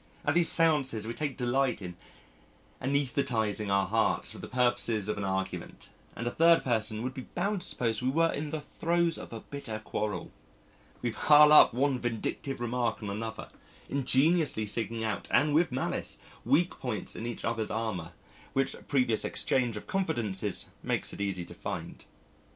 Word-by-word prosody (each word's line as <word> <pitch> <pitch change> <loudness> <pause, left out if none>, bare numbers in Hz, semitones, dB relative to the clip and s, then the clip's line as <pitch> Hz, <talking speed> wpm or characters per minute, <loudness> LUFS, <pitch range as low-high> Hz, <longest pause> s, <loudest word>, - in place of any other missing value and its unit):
At - - +2
these 175 -1 +4
seances 140 -9 +2
we 115 - -3
take 145 +1 -3
delight 125 -1 +1
in 90 -3 -7 0.9
anaesthetising 125 -6 0
our 100 0 +3
hearts 110 +3 +1
for - - -9
the - - -7
purposes 120 -4 +1
of 105 -1 -2
argument, 95 0 -4 0.3
and 120 - -5
a 120 - 0
third 165 +3 +5
person 110 -2 -1
would 130 +1 -3
be 130 - -8
bound 195 +2 0
to - - -2
suppose 115 -2 -1
we 125 - +1
were 165 +4 +3
in 150 +1 -3
the 155 0 -3
throes 170 +2 0
of - - -9
a 115 -1 -6
bitter 135 -6 -6
quarrel. 105 -3 -4 0.7
We 120 - 0
pile 150 +4 +7
up - - +9
one 135 0 +1
vindictive 120 +3 -3
remark 120 -2 -1
on 100 - -3
another, 110 +2 -5 0.4
ingeniously 140 -2 +2
seeking 115 +1 -2
out 110 -2 -2
and 150 +1 +3
with 165 0 +3
malice 130 - -1 0.3
weak 150 +9 +2
points 110 -7 -3
in 115 - -4
each 120 - -5
other's 115 -2 -1
armour, 100 -7 -3 0.4
which 135 0 +1
previous 125 -6 +2
exchange 120 -4 +1
of - - -7
confidences 115 - -1 0.2
makes - - -2
it - - -6
easy 95 -3 -2
to - - -11
find. - - -6
120 Hz, 170 wpm, -30 LUFS, 110-145 Hz, 0.9 s, up